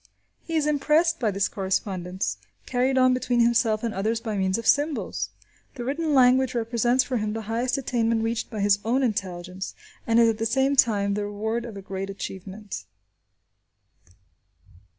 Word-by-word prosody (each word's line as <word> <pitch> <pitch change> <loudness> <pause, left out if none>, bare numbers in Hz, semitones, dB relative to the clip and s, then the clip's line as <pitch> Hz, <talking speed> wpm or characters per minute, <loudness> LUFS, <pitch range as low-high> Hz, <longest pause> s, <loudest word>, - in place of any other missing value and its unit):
He 330 - -5
is 310 -2 +2
impressed 300 +3 +2
by 225 - +1
this 200 0 +1
correspondence, 190 -1 -2 0.3
carried 260 +1 +1
on 255 0 +5
between 250 -1 0
himself 230 -2 +2
and 230 -2 -1
others 220 +4 -1
by 225 -2 -4
means 190 0 +1
of 230 - -5
symbols. 290 +1 +1 0.5
The 245 - -5
written 300 +3 0
language 255 0 +4
represents 240 +2 +2
for 255 -1 -2
him 210 -1 -2
the 225 0 -4
highest 235 +5 -1
attainment 230 -4 0
reached 230 0 -2
by 215 -3 -4
his 200 0 +3
own 250 +4 +1
intelligence, 185 -4 -3 0.3
and 230 0 +4
is 230 - +6
at 225 -1 0
the 225 - +1
same 265 +4 +2
time, 205 -6 +3
the 205 0 -2
reward 220 +3 -3
of 225 -4 -8
a 195 - -8
great 195 0 -5
achievement. 195 - -7
230 Hz, 170 wpm, -25 LUFS, 200-255 Hz, 0.5 s, is